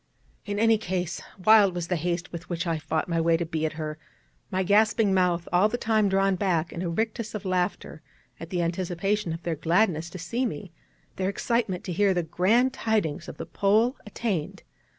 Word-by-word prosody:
In 205 0 -2
any 225 0 +4
case, 180 -3 -3 0.2
wild 210 -4 +6
was 175 -1 -3
the 180 - 0
haste 170 +1 -2
with 170 +1 -8
which 175 -1 -2
I 165 -2 -1
fought 155 +1 -2
my 165 -1 0
way 165 0 +3
to 170 - -2
be 160 -1 -1
at 155 - -6
her, 155 -1 -5 0.5
my 190 0 0
gasping 210 +1 +3
mouth 180 -2 +1
all 185 +4 +5
the 245 - -2
time 220 -3 +2
drawn 195 0 +2
back 175 -3 0
in 170 - -5
a 180 - -2
rictus 220 +4 -2
of 210 - -5
laughter 180 -4 -2 0.4
at 165 - -8
the 175 -1 -1
anticipation 180 +3 -1
of 165 +1 -6
their 170 - -1
gladness 170 +1 +1
to 185 - -8
see 230 +9 -2
me, 190 - -4 0.5
their 190 0 0
excitement 210 -3 -1
to 180 - -4
hear 195 +1 +2
the 175 - +1
grand 220 +11 +2
tidings 205 - -1
of - - -8
the - - -5
Pole 220 +6 +2
attained. 210 -6 -3
185 Hz, 200 wpm, -26 LUFS, 170-210 Hz, 0.5 s, wild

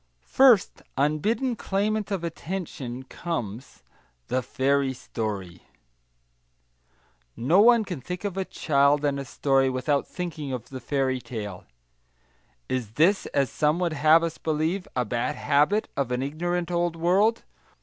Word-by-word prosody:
First, 255 -7 +4 0.2
unbidden 210 - +1
claimant 210 +1 -1
of 195 -4 -2
attention, 160 -7 -5
comes 130 - -6 0.5
THE 130 - +1
FAIRY 135 +1 0
STORY 100 -8 -5 1.8
No 155 +11 +3
one 235 -1 +6
can 180 -9 -5
think 180 +7 -6
of 200 -3 -3
a 195 - -1
child 145 -3 +2
and 140 -1 0
a 140 - -5
story, 135 +1 +2
without 130 +3 0
thinking 155 -6 -5
of 125 -3 -6
the 130 - -7
fairy 130 0 -1
tale. 105 -7 -7 1.0
Is 120 -5 -3
this, 180 - +3
as 140 -4 0
some 150 +1 +1
would 175 -2 0
have 155 +2 +5
us 165 -1 -3
believe, 160 +4 -1
a 125 -1 +1
bad 120 +2 -2
habit 150 +9 +2
of 135 -3 -1
an 125 +1 0
ignorant 175 +4 -2
old 175 -1 0
world? 195 +7 +2
150 Hz, 140 wpm, -26 LUFS, 130-180 Hz, 1.8 s, one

